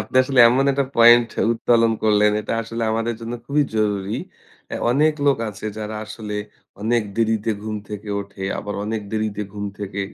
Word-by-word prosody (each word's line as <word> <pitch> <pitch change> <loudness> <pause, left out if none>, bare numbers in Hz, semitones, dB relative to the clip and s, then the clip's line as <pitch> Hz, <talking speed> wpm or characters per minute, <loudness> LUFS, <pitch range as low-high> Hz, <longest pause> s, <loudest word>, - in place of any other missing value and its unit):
আপনি - - -5
আসলে 130 -1 +3
এমন 130 +3 +2
একটা 140 0 +1
পয়েন্ট 120 0 +7 0.2
উত্তোলন 115 0 +3
করলেন, 105 -1 +4
এটা - - -2
আসলে 115 +1 -5
আমাদের 115 +1 -1
জন্য 115 +1 -5
খুবই 145 +1 +2
জরুরি। 105 -1 0 0.5
অ্যা - - -4 0.2
অনেক 155 +3 +3
লোক 140 - +4
আছে 105 +2 -8
যারা 110 0 -5
আসলে 110 -1 -6 0.5
অনেক 115 +1 +2
দেরিতে 110 -1 +1
ঘুম 110 0 -4
থেকে 105 0 -7
ওঠে, 100 -1 -8
আবার 105 - -5
অনেক 110 -1 -2
দেরিতে 110 -1 -2
ঘুম 105 0 -4
থেকে 100 0 -4
110 Hz, 170 wpm, -21 LUFS, 105-120 Hz, 0.5 s, পয়েন্ট